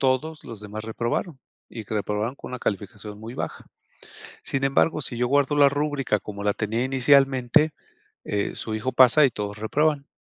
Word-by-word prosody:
Todos 140 +4 0
los 115 -3 -8
demás 105 +1 -7
reprobaron. 120 +7 -3 0.3
Y 115 -2 -7
que 100 - -9
reprobaron 105 +4 -1
con - - -10
una 125 - -4
calificación 105 +1 -4
muy 115 +3 -8
baja. - - -5 0.8
"Sin 135 0 -1
embargo, 140 +3 +2
si 120 - -4
yo 125 - +2
guardo 145 +1 +2
la 145 -1 +7
rúbrica 145 -6 0
como 100 0 -7
la 105 -1 +2
tenía 110 +2 -1
inicialmente, 135 +2 +3 0.5
eh, 100 -1 -2
su 110 - -3
hijo 125 +4 -2
pasa, 130 +4 +6
y - - 0
todos 105 -2 -5
reprueban. 145 +6 0
125 Hz, 175 wpm, -24 LUFS, 105-140 Hz, 0.8 s, la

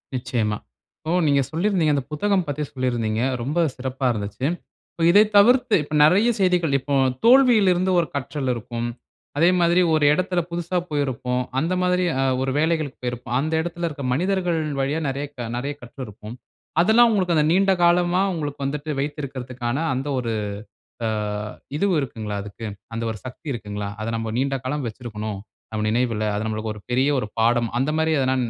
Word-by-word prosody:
நிச்சயமா. 120 -5 -1 0.4
இப்போ 160 +3 -1
நீங்க 140 -1 +4
சொல்லிருந்தீங்க, 170 -2 +1
அந்த 140 - -1
புத்தகம் 190 +4 +1
பத்தி 145 +1 -2
சொல்லிருந்தீங்க. 120 -4 -1 0.2
ரொம்ப 140 +7 -3 0.2
சிறப்பா 130 +1 -4
இருந்துச்சு. 105 +3 -4 0.5
இப்ப 165 - -4
இதை 205 +4 +7
தவிர்த்து. 245 +2 +5
இப்ப 150 - -10
நெறைய 190 +10 +5
செய்திகள். 180 -5 +2
இப்போ, 140 +2 -4 0.3
தோல்வியில 240 -6 +6
இருந்து 185 +2 0
ஒரு 170 - 0
கற்றல் 140 -1 -2
இருக்கும். 120 0 -4 0.5
அதே 170 +4 +5
மாதிரி 175 +1 +4
ஒரு 155 -1 +2
இடத்துல 180 +1 0
புதுசா 175 +1 -2
போயிருப்போம். 130 -4 -1 0.2
அந்த 165 +6 0
மாதிரி 180 0 +2 0.2
அ - - +2 0.2
ஒரு 135 0 0
வேலைகளுக்கு 155 -3 0
போயிருப்போம். 125 0 -3
அந்த 155 +3 -1
இடத்துல 175 +1 -4
இருக்குற 145 -4 -6
மனிதர்கள் 180 +2 0 0.2
வழியா 145 +4 0
நெறைய 140 +1 -2
க 120 -2 -4
நெறைய 140 +4 -3
கற்றிருப்போம். 115 -3 -9 0.5
அதெல்லாம் 230 +5 +6
உங்களுக்கு 185 -5 +1
அந்த 150 -1 +3
நீண்ட 195 +2 +4
காலமா, 175 +1 +3
உங்களுக்கு 145 -4 -4
வந்துட்டு 145 +2 -3
வைத்திருக்கதற்கான 130 -4 -4 0.2
அந்த 130 +2 -3
ஒரு 115 -2 -2 0.8
அ - - +1 0.7
இதுவு 200 +3 +2
இருக்குங்களா 110 -5 -4
அதுக்கு. 105 +2 -8 0.3
அந்த 115 - -3
ஒரு 110 - -6
சக்தி 130 +5 -9
இருக்குங்களா? 105 -3 -5
அத 110 - -3
நம்ம 115 -1 -3
நீண்ட 135 +1 0
காலம் 140 +1 -2
வச்சுருக்கணும். 110 -3 -6 0.3
நம்ம 110 -1 -2
நினைவுல. 115 -1 0
அது 105 +1 -2
நமக்கு 110 0 -3
ஒரு 105 - -11
பெரிய 130 +3 +3
ஒரு 105 - -3
பாடம். 120 +1 +3
அந்த 135 +3 +1
மாதிரி 160 0 +2
எதுனா 130 0 +1
140 Hz, 165 wpm, -23 LUFS, 120-175 Hz, 0.8 s, இதை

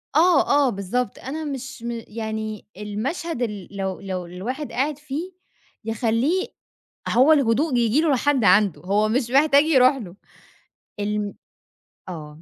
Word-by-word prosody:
آه، 335 0 +5 0.2
آه، - - +2
بالضبط، 200 +2 -2
أنا 300 +5 -5
مش 265 -4 -6
م 235 -1 -4
يعني 220 -1 -5
المشهد 240 - -4
ال 210 -6 -3
لو 190 -1 -3
لو 185 -2 -4
الواحد 235 - -5
قاعد 280 +3 -1
فيه 300 +5 -5 0.5
يخلّيه 230 - 0 0.6
هو 265 +6 +5
الهدوء 275 +1 +2
ييجي 240 +5 +3
له 320 -3 +2
لحد 270 -1 +1
عنده، 200 -2 +4
هو 205 +4 +1
مش 240 +1 0
محتاج 280 +1 +5
يروح 265 -3 +5
له، 195 -9 -8 0.9
الم 205 0 -2 0.8
آه 155 -3 -9
235 Hz, 135 wpm, -23 LUFS, 210-280 Hz, 0.9 s, آه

